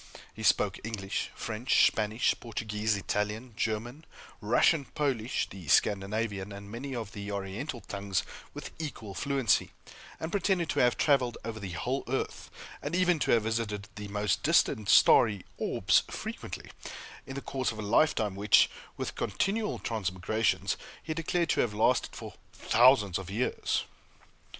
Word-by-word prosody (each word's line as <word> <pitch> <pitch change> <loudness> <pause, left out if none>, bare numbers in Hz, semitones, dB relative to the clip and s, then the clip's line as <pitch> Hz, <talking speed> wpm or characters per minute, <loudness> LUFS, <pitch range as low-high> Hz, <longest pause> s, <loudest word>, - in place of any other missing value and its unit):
He - - -9
spoke - - +2
English, 105 -3 -3
French, 115 +3 +2
Spanish, 110 +2 +2
Portuguese, 110 -2 -2
Italian, 105 +4 -2
German, 115 +7 -3 0.4
Russian, 135 +7 +3
Polish, 130 -5 0
the 95 -5 -11
Scandinavian, 100 - +1
and 100 0 -9
many 130 +4 -5
of 110 -3 -5
the 100 -1 -6
Oriental 100 +7 -4
tongues, 100 -1 -2 0.3
with - - -8
equal 115 -10 -6
fluency; 135 -3 +1 0.5
and 160 - -4
pretended 190 -4 +1
to - - -1
have 125 -1 +3
traveled 130 -5 +2
over 115 -1 -5
the 95 -4 -6
whole 125 +10 -2
earth, 135 +2 -3 0.3
and - - -3
even 180 -2 +3
to - - -1
have 115 -2 +4
visited 105 -3 -2
the 105 -1 -7
most 105 -1 0
distant 105 -2 +2
starry 105 -4 +6
orbs - - +3
frequently, - - -6 0.6
in 135 - -6
the - - -2
course 130 -2 -2
of 110 - -9
a 110 - -4
lifetime 110 -2 +2
which, 100 +2 +4 0.3
with - - -3
continual 210 +2 -1
transmigrations, 110 +1 -1 0.3
he 160 - -3
declared 165 +1 -1
to - - +3
have 105 -3 -1
lasted 120 +4 +2
for - - -8 0.4
thousands 110 -6 +5
of 95 -2 -8
years. 115 +6 -1
110 Hz, 145 wpm, -30 LUFS, 100-130 Hz, 0.6 s, starry